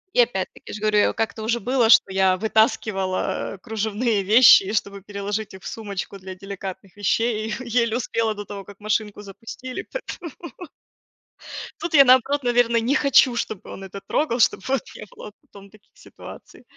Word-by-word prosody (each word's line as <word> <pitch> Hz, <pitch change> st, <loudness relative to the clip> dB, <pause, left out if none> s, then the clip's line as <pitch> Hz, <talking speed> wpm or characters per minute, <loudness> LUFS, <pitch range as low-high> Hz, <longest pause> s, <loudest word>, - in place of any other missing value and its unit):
И -, -, +2 dB
опять-таки, 195 Hz, -6 st, -2 dB
я -, -, -7 dB
ж -, -, -7 dB
говорю, 215 Hz, -1 st, +2 dB
я -, -, +4 dB
у -, -, -4 dB
как-то 225 Hz, 0 st, -3 dB
уже 235 Hz, +2 st, 0 dB
было, 245 Hz, 0 st, +1 dB
что 195 Hz, -, +6 dB
я 190 Hz, -1 st, +3 dB
вытаскивала 205 Hz, -3 st, 0 dB
кружевные 220 Hz, 0 st, -1 dB
вещи 215 Hz, +1 st, +7 dB
и 200 Hz, -, -4 dB
чтобы 200 Hz, -1 st, -2 dB
переложить 205 Hz, +1 st, -4 dB
их 190 Hz, -, -13 dB
в -, -, -7 dB
сумочку 200 Hz, -2 st, -6 dB
для 190 Hz, 0 st, -8 dB
деликатных 195 Hz, 0 st, -8 dB
вещей, 215 Hz, +2 st, 0 dB
и 240 Hz, +3 st, -5 dB
еле 230 Hz, 0 st, 0 dB
успела 230 Hz, -2 st, -1 dB
до 205 Hz, 0 st, -7 dB
того, 200 Hz, -1 st, -8 dB
как 200 Hz, +1 st, -15 dB
машинку 215 Hz, -1 st, -2 dB
запустили, 230 Hz, +6 st, -8 dB
поэтому 355 Hz, -, -7 dB, 1.5 s
Тут 335 Hz, -1 st, -5 dB
я, 280 Hz, -, +9 dB
наоборот, 260 Hz, +2 st, +4 dB
наверно, 240 Hz, -1 st, +2 dB
не 250 Hz, +6 st, 0 dB
хочу, 270 Hz, -3 st, +4 dB
чтобы 220 Hz, -4 st, -3 dB
он 195 Hz, -, -9 dB
это 195 Hz, +1 st, -8 dB
трогал, 255 Hz, -5 st, 0 dB
чтобы 200 Hz, -, +2 dB
вот 270 Hz, -2 st, +1 dB
не -, -, -9 dB
было 210 Hz, -, -10 dB
потом 200 Hz, 0 st, -16 dB
таких 215 Hz, +1 st, -23 dB
ситуаций. -, -, -14 dB
215 Hz, 180 wpm, -22 LUFS, 200-240 Hz, 1.5 s, я